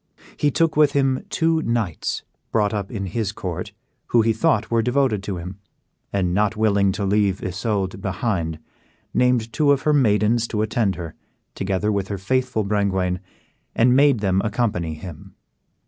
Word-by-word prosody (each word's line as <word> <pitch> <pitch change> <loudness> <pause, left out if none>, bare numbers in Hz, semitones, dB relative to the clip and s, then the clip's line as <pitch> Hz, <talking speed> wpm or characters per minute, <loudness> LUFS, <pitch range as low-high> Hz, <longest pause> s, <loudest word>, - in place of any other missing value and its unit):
He 145 - +2
took 165 +3 +1
with 150 -2 +4
him 135 -2 +1
two 160 0 +1
knights, 115 - -2 0.3
brought 105 -2 +1
up 100 -2 -3
in 100 -5 -4
his 100 +2 -2
court, - - -5 0.4
who 115 -2 +3
he 115 0 +2
thought 115 -2 +1
were 115 -1 +3
devoted 125 -3 +1
to 100 -2 -4
him; 90 +3 -7 0.5
and, 90 -3 0
not 105 +2 +1
willing 100 -3 +3
to 100 0 -2
leave 100 -1 +1
Isoude 95 0 -2
behind, 90 -5 -2 0.6
named 125 -3 +2
two 145 +4 +3
of 140 -1 +2
her 150 - +3
maidens 115 -3 +3
to 105 -2 -1
attend 110 -3 0
her, 85 -3 -7 0.4
together 100 +2 -1
with 100 -2 -1
her 100 - -3
faithful 125 +3 0
Brengwain, 95 -3 0 0.6
and 125 +2 +4
made 140 -5 +4
them 95 -2 +2
accompany 105 -9 -1
him. 80 -1 -10
105 Hz, 160 wpm, -22 LUFS, 95-120 Hz, 0.6 s, with